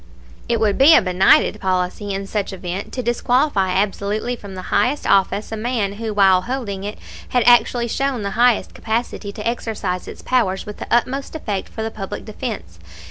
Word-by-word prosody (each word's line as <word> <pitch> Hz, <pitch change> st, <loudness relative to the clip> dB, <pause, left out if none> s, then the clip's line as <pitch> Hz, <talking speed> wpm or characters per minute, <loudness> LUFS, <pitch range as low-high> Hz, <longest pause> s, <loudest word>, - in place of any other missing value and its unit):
It 235 Hz, -, +1 dB
would 215 Hz, 0 st, +1 dB
be 300 Hz, +4 st, +8 dB
a -, -, +6 dB
benighted 185 Hz, +3 st, +4 dB
policy 185 Hz, +2 st, -1 dB
in 195 Hz, 0 st, -3 dB
such 200 Hz, 0 st, -2 dB
event 185 Hz, +1 st, -5 dB
to 255 Hz, -, -3 dB
disqualify 240 Hz, -3 st, +1 dB
absolutely 205 Hz, +4 st, -1 dB
from 200 Hz, -4 st, -10 dB
the 185 Hz, -, -6 dB
highest 275 Hz, +4 st, +1 dB
office 200 Hz, +2 st, +2 dB
a -, -, -2 dB
man 220 Hz, -3 st, -1 dB
who 220 Hz, +1 st, -4 dB
while 195 Hz, -3 st, +4 dB
holding 215 Hz, -4 st, -4 dB
it 205 Hz, +1 st, -5 dB, 0.3 s
had 250 Hz, -2 st, +2 dB
actually 240 Hz, 0 st, +4 dB
shown 265 Hz, -1 st, -1 dB
the 200 Hz, -, -2 dB
highest 240 Hz, +2 st, +2 dB
capacity 220 Hz, -2 st, -3 dB
to 210 Hz, +2 st, -5 dB
exercise 215 Hz, -6 st, -3 dB
its -, -, -10 dB
powers 210 Hz, -7 st, 0 dB
with 210 Hz, -, -8 dB
the -, -, -7 dB
utmost 265 Hz, +5 st, 0 dB
effect 210 Hz, -11 st, -3 dB
for 220 Hz, -, -5 dB
the 225 Hz, -, -3 dB
public 195 Hz, -3 st, -6 dB
defense. 215 Hz, -, -6 dB
215 Hz, 185 wpm, -20 LUFS, 195-240 Hz, 0.3 s, be